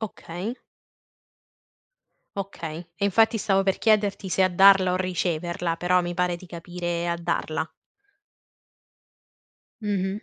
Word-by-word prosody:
Okay. 205 +1 -5 1.8
Okay, 170 -4 -6
e 200 - +1
infatti 225 +3 +3
stavo 195 -1 +2
per 195 -1 0
chiederti 205 -3 +2
se 185 +2 +2
a 185 - +3
darla 190 0 +6
o 185 - +1
riceverla, 175 -2 -1
però 180 +1 +2
mi 175 0 -3
pare 180 0 0
di 175 - -13
capire 175 0 -4
a 170 - 0
darla. 160 -1 -2 2.2
Mh-mh. 200 0 -2
180 Hz, 115 wpm, -25 LUFS, 175-195 Hz, 2.2 s, darla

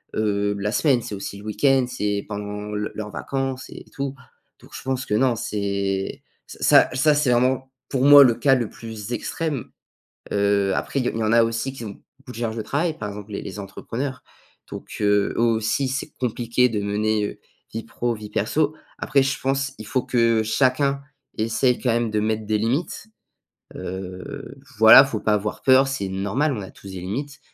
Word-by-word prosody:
heu, 105 -1 0
la 105 +1 -1
semaine, 135 -3 +3
c'est 105 - -6
aussi 100 0 -6
le 100 - -12
week-end, 130 +4 +2
c'est 105 -5 -2
pendant 105 0 -5
le 105 0 -3
leurs 105 -1 -5
vacances 135 -1 -3
et - - -10
tout. 140 -1 -3 0.5
Donc, - - -18
je - - -7
pense 130 -1 -2
que - - -3
non, 125 +2 +3
c'est 100 -3 -2 0.3
ça - - +4
ça, 150 +4 +4
c'est 145 -3 +2
vraiment, 130 +2 +1 0.2
pour 130 -2 0
moi, 145 0 +10
le 120 -3 +3
cas 135 -2 +4
le 120 -4 -1
plus 110 0 -7
extrême. 145 +1 -3 0.6
Heu, 100 -1 +2
après, 140 - -2
il - - -3
y - - +2
il - - -5
y 115 - -1
en 110 - +1
a 115 0 +6
aussi 115 +4 -2
qui 125 - -8
ont 100 - -9 0.2
beaucoup 135 -2 -12
de 120 - -10
charge 115 -2 -2
de 110 - -1
travail, 155 +7 -1
par 105 - -4
exemple 105 +1 -9
les - - -3
les 100 +1 -7
entrepreneurs. 125 +7 -5 0.5
Donc, - - -8
heu, 105 -1 +2
eux - - -2
aussi, 115 +3 +1
c'est 135 +3 -4
compliqué 120 0 +1
de 110 -3 -2
mener, 105 +1 0
heu, - - -9 0.3
vie 115 - -4
pro 120 +1 -2
vie 105 -1 -8
perso. 145 +9 0 0.2
Après, 140 -2 +2
je 135 - -1
pense, 135 +1 -1
il 110 - -9
faut 130 -3 0
que 115 -2 +2
chacun 140 +4 +1 0.4
essaie 115 +3 +1
quand 125 - +1
même 115 0 +1
de 105 - +1
mettre 110 0 -1
des 105 0 +1
limites. 130 - -2 0.7
Heu, 95 +10 -7 0.2
voilà, 110 +4 +10
il 135 - +2
faut 115 -6 -3
pas 105 - +1
avoir 105 0 -2
peur, 130 +1 +6
c'est 135 -8 -3
normal, 100 +11 0
on 105 - -4
a 95 - -9
tous 100 - -14
des 95 - -6
limites. 135 +10 -5
115 Hz, 205 wpm, -23 LUFS, 105-135 Hz, 0.7 s, moi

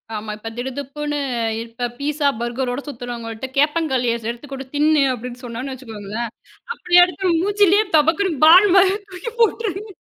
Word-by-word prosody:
ஆமா. 210 0 -5
இப்ப 225 +1 -7
திடுதிப்புன்னு, 285 +3 -4 0.4
இப்ப 235 +1 -4
பீட்சா, 295 0 0
பர்கரோட 245 +2 -2
சுத்துறவங்க 240 -3 -6
கிட்ட 240 +4 -6
கேப்பங்களிய 285 -5 +1
செடுத்து 230 -1 -5
எடுத்து 285 +5 -14
கொடுத்து, 270 0 -8
"தின்னு" 300 -1 +4
அப்படின்னு 250 +1 -8
சொன்னோம்னு 245 +3 -5
வெச்சுக்கோங்களேன், 225 -2 -6 0.4
அப்படியே 355 -4 +4
எடுத்து 365 +2 -2
நம்ம 335 -2 +2
மூஞ்சிலேயே 410 +1 +3
தபக்குனு 325 +4 +2
பால் 365 +6 +8
மாதிரி 380 +1 +5
தூக்கி 370 +5 -7
போட்டுருவாங்க. 425 -3 0
280 Hz, 150 wpm, -20 LUFS, 240-355 Hz, 0.4 s, பால்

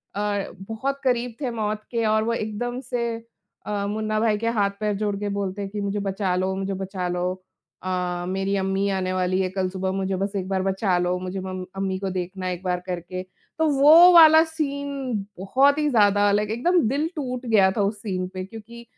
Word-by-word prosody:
अ, 205 -1 -2 0.2
बहुत 270 +5 -2
करीब 245 -2 0
थे 255 -3 -1
मौत 215 -2 -3
के 230 -2 0
और 215 0 +2
वो 230 - 0
एकदम 230 +3 -3
से 235 -2 -2 0.5
अ, 205 -1 -2
मुन्ना 215 +1 -1
भाई 215 -1 +2
के 230 +2 -2
हाथ-पैर 200 +1 0
जोड़ 205 -1 -1
के 205 0 -2
बोलते 200 0 -3
हैं 195 - -4
कि, 210 0 -4
"मुझे 200 +1 -2
बचा 195 -2 -1
लो 185 +1 0
मुझे 195 0 -3
बचा 190 -1 -4
लो 180 0 -2 0.6
अ, 180 -1 -2
मेरी 195 +1 -1
अम्मी 195 +1 0
आने 185 -1 -1
वाली 185 0 0
है 185 - 0
कल 190 0 -2
सुबह 190 0 -2
मुझे 190 0 -1
बस 200 +2 -3
एक 185 -1 -3
बार 190 -1 0
बचा 190 -1 +1
लो, 180 +1 0
मुझे 185 +1 -5
मम 185 0 -5
अम्मी 190 -1 -1
को 195 -1 -3
देखना 185 +1 -4
एक 180 0 -5
बार 180 -1 0
करके।" 180 +1 -4
तो 250 +12 -4
वो 330 +5 +9
वाला 320 -1 +9
सीन 280 -8 -3
बहुत 270 +9 +3
ही 300 -1 +2
ज़्यादा 205 -4 +4
लाइक 210 +1 +1
एकदम 340 +11 +2
दिल 285 +5 0
टूट 255 -4 -4
गया 205 -5 +4
था - - +2
उस 200 +1 -1
सीन 185 -4 -3
पे 185 0 -5
क्योंकि 225 +3 -11
200 Hz, 205 wpm, -24 LUFS, 190-235 Hz, 0.6 s, वो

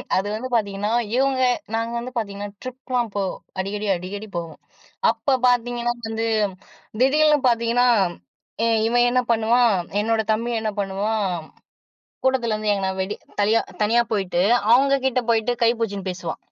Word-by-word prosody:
அது 190 +2 0
வந்து 240 +4 -4
பார்த்தீங்கன்னா, 205 -1 -1 0.2
இவுங்க 265 0 +2 0.4
நாங்க 230 +1 -2
வந்து 245 +2 -6
பார்த்தீங்கன்னா 205 -2 -4 0.2
ட்ரிப்லாம் 255 -2 -3
போவோம். 195 -2 -2 0.2
அடிக்கடி, 205 +2 -3
அடிக்கடி 195 +4 -6
போவோம். 165 -2 -6 0.5
அப்ப 235 +4 0
பார்த்தீங்கன்னா, 240 -1 +1
வந்து 225 0 -2 0.8
திடீர்னு 300 +3 +4
பார்த்தீங்கன்னா, 235 +1 +2 0.8
ஏ - - +3 0.2
இவன் 240 +1 +3
என்ன 250 +1 +2
பண்ணுவான், 230 +1 +3 0.3
என்னோட 225 +1 +1
தம்பி 235 +2 -2
என்ன 215 -1 -1
பண்ணுவான். 200 +2 -1 1.0
கூட்டத்துலேருந்து 230 -5 +1
எங்கனா 195 -1 -1
வெடி 190 +2 -2 0.3
தனியா 215 +3 +3 0.2
தனியா 230 +3 +3
போயிட்டு 190 -4 0 0.3
அவுங்கக்கிட்ட 265 0 +3
போயிட்டு 230 +1 +2
கை 230 - +6
புடுச்சின்னு 200 -4 -3
பேசுவான். 180 -3 -5
225 Hz, 130 wpm, -22 LUFS, 205-245 Hz, 1.0 s, கை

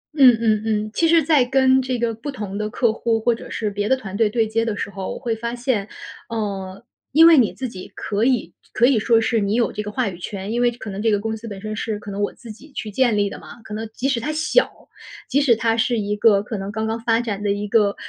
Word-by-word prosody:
嗯 255 -6 +7
嗯 215 -2 +2
嗯。 215 -1 -1
其 330 - +2
实 330 -1 +5
在 295 -4 +4
跟 265 0 +4
这 255 -1 -2
个 235 -1 -1
不 240 +6 -6
同 205 -5 -6
的 215 0 -2
客 235 -1 +1
户 225 0 0
或 235 +2 +2
者 - - -9
是 215 -2 -2
别 205 +1 -2
的 265 - +3
团 195 -6 -8
队 215 0 +2
对 225 0 +1
接 225 +1 0
的 220 -3 -2
时 - - -3
候， 195 -1 -5
我 - - -7
会 235 -4 -2
发 235 +2 -4
现， 240 -5 -1 0.4
呃， 200 -3 -4 0.3
因 320 +4 +7
为 330 -2 +8
你 235 -5 +4
自 260 - -5
己 185 -5 -10
可 210 +1 -2
以 245 -8 +1
就 - - -29
可 240 - +4
以 250 -4 +4
说 230 +1 +3
是 225 0 +1
你 205 +1 0
有 235 - +1
这 210 - -4
个 210 0 -6
话 240 -3 -1
语 175 -1 -9
权。 195 +2 -5
因 240 +1 0
为 245 - +4
可 225 -3 -8
能 195 - -5
这 225 - +2
个 205 -1 +2
公 220 +1 -3
司 225 +1 -9
本 200 -2 -7
身 215 0 -5
是 215 -1 -3
可 205 -1 -9
能 200 +1 -4
我 205 - 0
自 235 -2 -12
己 270 +8 -14
去 215 -5 -5
建 235 -1 +2
立 205 - +2
的 - - -7
嘛， - - -13
可 215 - -9
能 220 +1 -5
即 265 - -1
使 265 -4 +1
它 300 +7 -3
小， 315 +11 +2 0.6
即 285 - +2
使 245 -5 +4
它 225 0 +1
是 235 +1 +1
一 210 0 -1
个 205 -1 +4
可 215 -2 -5
能 195 +1 -5
刚 220 +1 -3
刚 225 +1 -2
发 230 0 +1
展 210 -4 -3
的 205 - -1
一 205 +1 -1
个 205 -2 +2
225 Hz, 305 characters per minute, -21 LUFS, 210-245 Hz, 0.6 s, 为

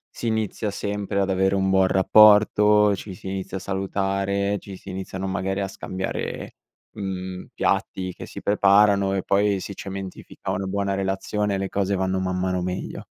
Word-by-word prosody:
si 120 - -4
inizia 110 -1 -1
sempre 100 0 -2
ad 100 - +1
avere 95 +1 +2
un 95 0 +1
buon 95 0 +4
rapporto, 105 +1 +6
ci 95 0 -8
si 95 - -10
inizia 95 0 -4
a - - -5
salutare, 100 +1 -1
ci 95 -2 -10
si 95 - -12
iniziano 95 0 -5
magari 95 0 -2
a 100 - -1
scambiare, 95 0 -5 0.4
mhmm, 95 -2 -5
piatti 95 -1 -1
che - - -9
si - - -9
preparano 100 -1 +4
e 95 - -1
poi 100 0 +2
si 100 - -6
cementifica 95 -1 -6
una 95 - -2
buona 100 0 -1
relazione 100 +1 -1
le 95 - -2
cose 100 0 0
vanno 95 0 0
man 95 0 -1
mano 90 -1 0
meglio. 90 +1 -4
95 Hz, 170 wpm, -24 LUFS, 95-100 Hz, 0.4 s, rapporto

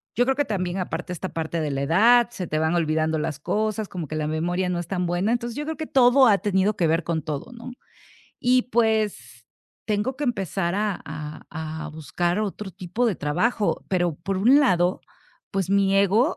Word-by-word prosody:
Yo 245 - +3
creo 265 +1 +1
que 290 0 +1
también 185 -2 -2
aparte, 180 -1 -4
esta 185 +2 -5
parte 165 +1 -2
de 150 -2 -2
la 135 0 -2
edad, 230 +11 +5
se 185 -6 -5
te 155 - -2
van 160 +2 +1
olvidando 160 -1 +1
las 150 -1 -3
cosas, 215 +4 -1
como 175 -4 -5
que 155 - -5
la 155 -1 -1
memoria 175 +4 -1
no 175 -1 -1
es 175 - -5
tan 180 -1 -1
buena, 175 +6 0
entonces 240 -1 -2
yo 295 - -3
creo 320 0 -4
que 315 - -5
todo 260 0 +5
ha 205 -3 +5
tenido 200 +1 +1
que 170 - +1
ver 165 +1 +1
con 165 -1 -1
todo, 150 - -5
¿no?, 235 +1 -9 0.7
y 250 0 +3
pues, 220 -4 -1 0.4
tengo 215 +4 0
que - - -6
empezar 195 - -1
a 210 -3 -1
a 155 0 -7 0.4
a - - -5
buscar 160 +4 -2
otro 205 -1 -4
tipo 185 +6 -3
de 205 - 0
trabajo, 205 +9 0
pero 175 -3 +1
por 195 +4 -3
un 255 +9 +6
lado, 180 -8 +2 0.5
pues, 195 -2 -2
mi 195 0 +3
ego, 205 - +3
190 Hz, 205 wpm, -24 LUFS, 165-220 Hz, 0.7 s, un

